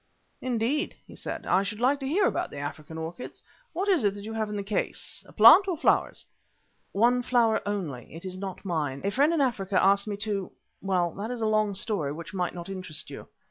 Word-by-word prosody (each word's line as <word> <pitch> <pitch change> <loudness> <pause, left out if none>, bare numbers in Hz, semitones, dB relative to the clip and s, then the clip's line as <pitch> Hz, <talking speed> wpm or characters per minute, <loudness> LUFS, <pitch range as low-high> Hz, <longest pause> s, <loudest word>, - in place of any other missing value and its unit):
"Indeed," 255 +6 0
he - - -13
said. - - -6
"I 185 - +3
should 205 +2 -4
like 265 +4 +3
to 270 - -4
hear 370 +8 +2
about - - 0
the - - -9
African 145 +2 -6
orchids. 165 +9 -7 0.3
What 370 +4 -2
is 365 - +3
it 200 -1 +2
you 205 +2 -7
have 220 -1 -2
in 210 - -4
the 200 - -2
case, 205 +1 -3
a - - -15
plant 395 - +8
or 360 -4 -1
flowers?" - - +1 0.7
"One 240 +4 +3
flower 240 -3 +2
only. 165 - -4
It 170 - -9
is 185 -1 -5
not 190 0 -6
mine. 150 -7 -2
A 200 - 0
friend 285 +8 +3
in 330 -3 +2
Africa 200 -7 +1
asked 200 +2 +3
me 205 -1 -3
to 205 -2 -3 0.3
well, 180 -3 +1
that 210 +3 -4
is 245 -2 -4
a - - +1
long 215 -2 +2
story 190 -8 -1
which 165 +5 -8
might 180 -2 -2
not 170 0 -7
interest 185 -5 -5
you." - - -9
205 Hz, 220 wpm, -27 LUFS, 180-240 Hz, 0.7 s, plant